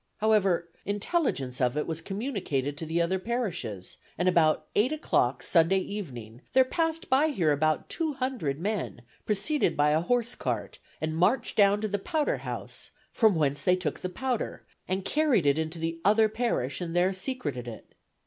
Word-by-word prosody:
However, 195 Hz, -6 st, +2 dB, 0.2 s
intelligence 205 Hz, -, -1 dB
of 125 Hz, +2 st, +1 dB
it 150 Hz, -, 0 dB
was 165 Hz, 0 st, -3 dB
communicated 195 Hz, -, -2 dB
to 160 Hz, +2 st, -6 dB
the 165 Hz, +2 st, 0 dB
other 185 Hz, +3 st, 0 dB
parishes, 185 Hz, -, -3 dB, 0.2 s
and 180 Hz, -, +1 dB
about 155 Hz, -3 st, +3 dB
eight 225 Hz, +7 st, +3 dB
o'clock 130 Hz, -, +1 dB
Sunday 170 Hz, +2 st, +4 dB
evening 130 Hz, -, -6 dB
there 260 Hz, +1 st, +6 dB
passed 325 Hz, +3 st, -1 dB
by 275 Hz, +4 st, +4 dB
here 180 Hz, -, +1 dB
about 155 Hz, +2 st, +1 dB
two 320 Hz, -3 st, -1 dB
hundred 255 Hz, -, -2 dB
men, 195 Hz, -, -3 dB, 0.2 s
preceded 215 Hz, +9 st, +1 dB
by 145 Hz, 0 st, +4 dB
a 155 Hz, +1 st, +3 dB
horsecart, 245 Hz, +5 st, -1 dB, 0.2 s
and 155 Hz, 0 st, -2 dB
marched 180 Hz, +10 st, +2 dB
down 205 Hz, 0 st, +4 dB
to 215 Hz, -, 0 dB
the 205 Hz, 0 st, -2 dB
powder 300 Hz, +9 st, 0 dB
house, -, -, -5 dB, 0.2 s
from 220 Hz, -5 st, +4 dB
whence 145 Hz, -2 st, 0 dB
they 180 Hz, -, +4 dB
took 180 Hz, -4 st, -3 dB
the 185 Hz, -, -3 dB
powder, 250 Hz, +5 st, -3 dB, 0.2 s
and 185 Hz, +1 st, -2 dB
carried 290 Hz, -, +2 dB
it 140 Hz, +2 st, +3 dB
into 160 Hz, +1 st, -3 dB
the 165 Hz, 0 st, -3 dB
other 215 Hz, +3 st, +5 dB
parish 215 Hz, -, -1 dB
and 170 Hz, -1 st, -4 dB
there 180 Hz, +2 st, +3 dB
secreted 185 Hz, -, -3 dB
it. 115 Hz, -2 st, -10 dB
185 Hz, 170 wpm, -28 LUFS, 155-230 Hz, 0.2 s, there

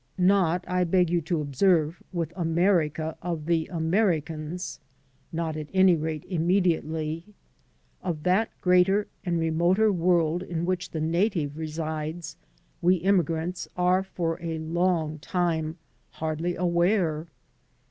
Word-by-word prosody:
Not, 180 Hz, -2 st, +3 dB
I 180 Hz, 0 st, +1 dB
beg 180 Hz, 0 st, +2 dB
you 175 Hz, -1 st, +2 dB
to 160 Hz, 0 st, -1 dB
observe, 155 Hz, +3 st, +2 dB
with 170 Hz, -2 st, -3 dB
America 165 Hz, -3 st, +1 dB
of 170 Hz, -3 st, -3 dB
the 165 Hz, -1 st, +1 dB
Americans; 165 Hz, -2 st, -1 dB, 0.5 s
not, 165 Hz, -1 st, -2 dB
at 155 Hz, -1 st, -5 dB
any 190 Hz, -2 st, +6 dB
rate, 155 Hz, -1 st, -3 dB
inmiediately 165 Hz, -3 st, 0 dB
• 210 Hz, -, -20 dB, 0.7 s
Of 165 Hz, -5 st, -3 dB
that 190 Hz, +5 st, +2 dB
greater 185 Hz, +3 st, +4 dB, 0.2 s
and 175 Hz, -2 st, 0 dB
remoter 170 Hz, +6 st, +3 dB
world 170 Hz, -1 st, +2 dB
in 170 Hz, -2 st, -3 dB
which 180 Hz, 0 st, -2 dB
the 160 Hz, -, -4 dB
native 165 Hz, -2 st, 0 dB
resides 155 Hz, +1 st, -4 dB, 0.5 s
we 180 Hz, +2 st, +4 dB
immigrants 175 Hz, -1 st, 0 dB
are 180 Hz, +1 st, +3 dB
for 170 Hz, -4 st, -3 dB
a 165 Hz, -1 st, -3 dB
Icmg 160 Hz, -1 st, 0 dB
time 165 Hz, -3 st, -1 dB, 0.4 s
hardly 160 Hz, +2 st, -2 dB
aware. 170 Hz, -2 st, +1 dB
170 Hz, 125 wpm, -26 LUFS, 160-180 Hz, 0.7 s, any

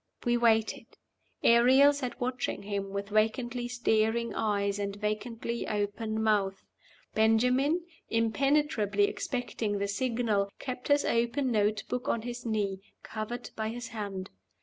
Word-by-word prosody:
We 240 Hz, 0 st, +3 dB
waited. 225 Hz, -2 st, +2 dB, 0.6 s
Ariel 260 Hz, +5 st, +6 dB
sat 270 Hz, -3 st, -4 dB
watching 250 Hz, -5 st, -2 dB
him 200 Hz, -1 st, -3 dB
with 200 Hz, +1 st, -4 dB
vacantly 240 Hz, +3 st, 0 dB
staring 235 Hz, -1 st, +1 dB
eyes 200 Hz, -2 st, 0 dB
and 200 Hz, -1 st, -2 dB
vacantly 220 Hz, +3 st, -3 dB
open 215 Hz, +1 st, -2 dB
mouth. 200 Hz, -3 st, +1 dB, 0.5 s
Ben 220 Hz, +1 st, +4 dB
jamin, 265 Hz, +8 st, +2 dB, 0.3 s
impenetrably 230 Hz, -2 st, +2 dB
expecting 220 Hz, -1 st, -2 dB
the 200 Hz, 0 st, -1 dB
signal, 220 Hz, -2 st, 0 dB
kept 250 Hz, -1 st, -6 dB
his 285 Hz, 0 st, +3 dB
open 240 Hz, +3 st, +1 dB
note 210 Hz, -1 st, +1 dB
book 250 Hz, 0 st, -3 dB
on 230 Hz, -, 0 dB
his 245 Hz, 0 st, -5 dB
knee, 205 Hz, -3 st, -1 dB, 0.2 s
covered 225 Hz, +3 st, -5 dB
by 220 Hz, 0 st, -2 dB
his 240 Hz, +1 st, -6 dB
hand. 200 Hz, -4 st, -5 dB
225 Hz, 130 wpm, -30 LUFS, 205-245 Hz, 0.6 s, Ariel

